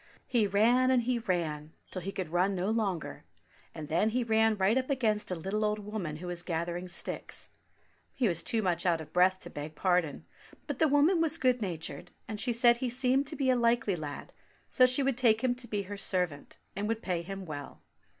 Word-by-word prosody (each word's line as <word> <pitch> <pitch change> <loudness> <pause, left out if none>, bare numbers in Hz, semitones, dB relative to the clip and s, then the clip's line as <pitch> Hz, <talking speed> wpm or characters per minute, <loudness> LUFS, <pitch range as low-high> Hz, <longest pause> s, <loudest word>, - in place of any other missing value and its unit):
He 235 -5 +2
ran, 235 +6 +4
and 255 -2 +3
he 245 0 0
ran, 160 -8 -2 0.2
till 185 - -4
he 195 +3 -4
could 185 -4 -4
run 185 +3 +2
no 185 +3 -1
longer, 190 - -2 0.5
and 155 -1 -6
then 170 +8 +2
he 245 +2 0
ran 220 -1 +3
right 195 +3 +3
up 260 +1 0
against 225 -6 0
a 180 - -1
little 195 +6 -2
old 210 0 +1
woman 205 -7 -5
who 165 +4 -8
was 175 -1 -3
gathering 175 +1 -3
sticks. 180 - -5 0.7
He 255 -4 +2
was 170 -4 +1
too 225 -3 -1
much 180 -3 0
out 170 -3 +2
of 155 -1 -10
breath 185 +1 +4
to - - -9
beg 150 +1 -7
pardon, 175 -4 0 0.4
but 290 -4 -5
the 320 - +5
woman 300 +5 +4
was 325 -1 +2
good 255 -4 +2
natured, 170 -5 -5 0.2
and 215 -1 -5
she 245 - +1
said 235 0 +5
he 250 0 -2
seemed 260 +2 +1
to 305 - -3
be 270 -3 +2
a - - +3
likely 235 -4 +2
lad, 150 -3 -7 0.4
so 255 -2 +6
she 255 +2 +3
would 265 -2 0
take 225 -2 +3
him 255 -1 +3
to 245 0 -6
be 205 -2 -2
her 205 +1 -7
servant, 180 -7 -2 0.2
and 205 +2 -2
would 225 +1 -2
pay 180 -3 -1
him 195 +2 -7
well. 145 -3 -8
210 Hz, 220 wpm, -30 LUFS, 175-245 Hz, 0.7 s, so